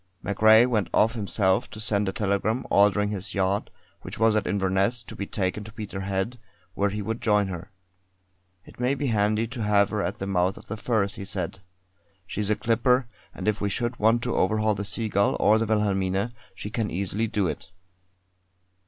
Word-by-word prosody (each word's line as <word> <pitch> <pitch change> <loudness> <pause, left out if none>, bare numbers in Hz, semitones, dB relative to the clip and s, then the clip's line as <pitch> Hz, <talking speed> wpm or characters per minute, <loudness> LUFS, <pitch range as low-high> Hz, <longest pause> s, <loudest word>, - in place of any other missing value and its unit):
MacRae 110 +3 +6
went 110 -7 0
off 110 +1 +4
himself 100 -3 0
to 110 - -9
send 105 -2 0
a - - -1
telegram 105 +4 -1
ordering 105 +1 +4
his 100 -1 -5
yacht, 95 +1 0 0.3
which - - -8
was 110 0 +3
at 105 - 0
Inverness, 100 +4 0
to - - -10
be 100 - -5
taken 100 +1 -2
to 105 - -10
Peterhead, 100 +1 -4 0.3
where 100 +2 +1
he 105 +1 -4
would 115 +3 -3
join 105 -2 +2
her. 90 0 -7 1.0
"It - - -16
may 125 +3 +1
be 145 - -3
handy 105 +2 +2
to 125 -1 -6
have 105 -1 +3
her 105 -1 -1
at - - -2
the 95 - -4
mouth 95 -1 +1
of - - -12
the 110 - -3
Firth," 110 -3 0
he - - -7
said. 95 0 -4 0.7
"She's 105 +2 -3
a 105 - +3
clipper, 120 +3 +2 0.3
and - - -7
if 105 0 +1
we 100 - 0
should 120 +5 -2
want 115 +3 +3
to 120 - -1
overhaul 110 +2 +2
the 100 0 -4
Seagull 100 0 +1
or 110 +1 +4
the 115 - 0
Wilhelmina, 100 -1 0 0.2
she 105 - -7
can 110 -2 -1
easily 100 +5 -1
do 105 -3 0
it." 90 - -4
105 Hz, 190 wpm, -26 LUFS, 100-110 Hz, 1.0 s, MacRae